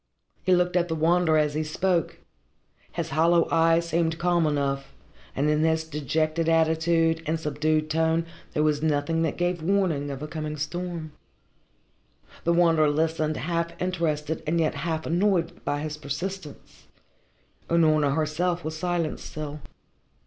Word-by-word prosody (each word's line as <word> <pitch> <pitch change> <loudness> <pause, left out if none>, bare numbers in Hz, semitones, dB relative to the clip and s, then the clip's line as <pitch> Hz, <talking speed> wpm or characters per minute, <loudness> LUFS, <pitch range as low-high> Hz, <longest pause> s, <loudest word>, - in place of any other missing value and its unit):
He 185 - +3
looked 180 0 +1
at 175 -1 +2
the 160 - -2
Wanderer 160 0 +3
as 150 -1 +2
he 155 +1 -1
spoke. 170 +2 0 0.8
His - - -3
hollow 165 +3 +3
eyes 165 +1 +3
seemed 165 0 0
calm 175 -1 +2
enough, 140 -2 -2 0.4
and 140 +2 +1
in 150 0 +2
his 160 0 +2
dejected 155 +2 -1
attitude 165 0 +2
and 160 +1 0
subdued 155 0 0
tone 160 +1 +1 0.3
there 150 - +2
was 150 -1 +1
nothing 155 +1 +1
that 160 -2 -1
gave 175 -1 0
warning 170 -5 +1
of 140 +1 -5
a - - -4
coming 155 -1 -5
storm. 170 +1 -4 1.3
The 170 - +3
Wanderer 165 -3 +4
listened, 155 0 0
half 170 +3 -2
interested 160 -4 -1
and 170 +2 +1
yet 160 -1 +1
half 160 -2 -3
annoyed 175 -1 0
by 145 0 -1
his 150 0 -4
persistence. 155 +2 -7 0.8
Unorna 155 -4 +3
herself 170 +3 0
was 155 0 -3
silent 170 -1 -1
still. 150 -1 -6
160 Hz, 145 wpm, -26 LUFS, 155-170 Hz, 1.3 s, Wanderer